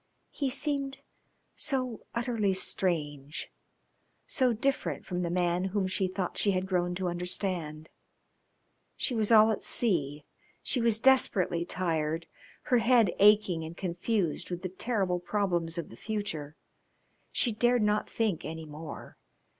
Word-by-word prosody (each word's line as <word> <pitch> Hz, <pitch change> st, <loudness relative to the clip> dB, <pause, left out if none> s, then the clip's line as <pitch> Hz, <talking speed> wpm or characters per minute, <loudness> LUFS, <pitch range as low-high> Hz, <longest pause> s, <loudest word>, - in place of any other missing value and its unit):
He 280 Hz, -2 st, -1 dB
seemed 275 Hz, 0 st, +1 dB, 0.6 s
so 255 Hz, -6 st, -2 dB
utterly 230 Hz, -5 st, 0 dB
strange, 150 Hz, -6 st, -2 dB, 0.7 s
so 255 Hz, -3 st, +2 dB
different 265 Hz, +5 st, -1 dB
from 180 Hz, -1 st, -3 dB
the 175 Hz, -, -1 dB
man 175 Hz, +1 st, +1 dB
whom 195 Hz, 0 st, 0 dB
she 185 Hz, 0 st, 0 dB
thought 185 Hz, -1 st, -3 dB
she 200 Hz, -, +3 dB
had 185 Hz, 0 st, 0 dB
grown 180 Hz, -2 st, 0 dB
to 185 Hz, 0 st, -2 dB
understand. 175 Hz, -3 st, -2 dB, 1.1 s
She 255 Hz, -, -1 dB
was 220 Hz, -1 st, +1 dB
all 220 Hz, 0 st, +7 dB
at 215 Hz, -, -2 dB
sea. 150 Hz, -, -1 dB, 0.4 s
She 250 Hz, -, +1 dB
was 230 Hz, -2 st, +3 dB
desperately 200 Hz, -10 st, +3 dB
tired, 165 Hz, -3 st, -1 dB, 0.4 s
her 245 Hz, -, +3 dB
head 230 Hz, -4 st, +4 dB
aching 205 Hz, -5 st, +5 dB
and 160 Hz, +1 st, -8 dB
confused 180 Hz, -1 st, -1 dB
with 175 Hz, 0 st, -5 dB
the 185 Hz, -, -2 dB
terrible 190 Hz, -2 st, -1 dB
problems 175 Hz, -3 st, -1 dB
of 170 Hz, -, -4 dB
the -, -, -11 dB
future. 165 Hz, -, -4 dB, 0.8 s
She 240 Hz, -, +2 dB
dared 240 Hz, +1 st, +2 dB
not 210 Hz, 0 st, +1 dB
think 215 Hz, -7 st, -1 dB
any 160 Hz, 0 st, -6 dB
more. 155 Hz, +1 st, -9 dB
190 Hz, 140 wpm, -29 LUFS, 170-225 Hz, 1.1 s, all